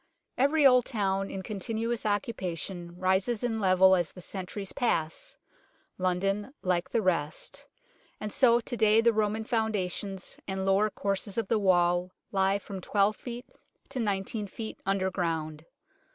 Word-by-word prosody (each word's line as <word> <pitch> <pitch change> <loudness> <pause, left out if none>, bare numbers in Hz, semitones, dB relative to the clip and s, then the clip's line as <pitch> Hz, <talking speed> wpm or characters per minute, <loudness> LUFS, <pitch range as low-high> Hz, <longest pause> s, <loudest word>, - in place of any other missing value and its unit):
Every 285 +3 +3
old 250 -2 +6
town 195 -4 -1
in 190 - -5
continuous 225 +3 -3
occupa 205 -4 -1
tion 175 0 -6
rises 190 +5 +1
in 225 -2 0
level 190 -1 +5
as 175 -3 -1
the - - -12
centuries 190 +2 -5
pass, 165 - -1 0.6
London 195 +7 0
like 180 -1 0
the 225 +2 0
rest, 165 -5 -2 0.5
and 210 -1 -5
so 240 -3 +5
to 240 +1 -5
day 220 -1 +5
the 235 0 +4
Roman 215 0 0
founda 220 -6 0
tions 195 0 -5
and 190 0 -2
lower 195 +2 +3
courses 200 0 -2
of 225 -4 -1
the 225 - +3
wall 175 -2 +3 0.2
lie 195 0 +2
from 195 -1 -8
12 205 +3 +2
ft. 245 0 -7 0.5
to 270 -2 -4
19 205 0 -1
ft. 220 +3 -7
underground. 170 -5 -1
195 Hz, 150 wpm, -29 LUFS, 185-220 Hz, 0.6 s, old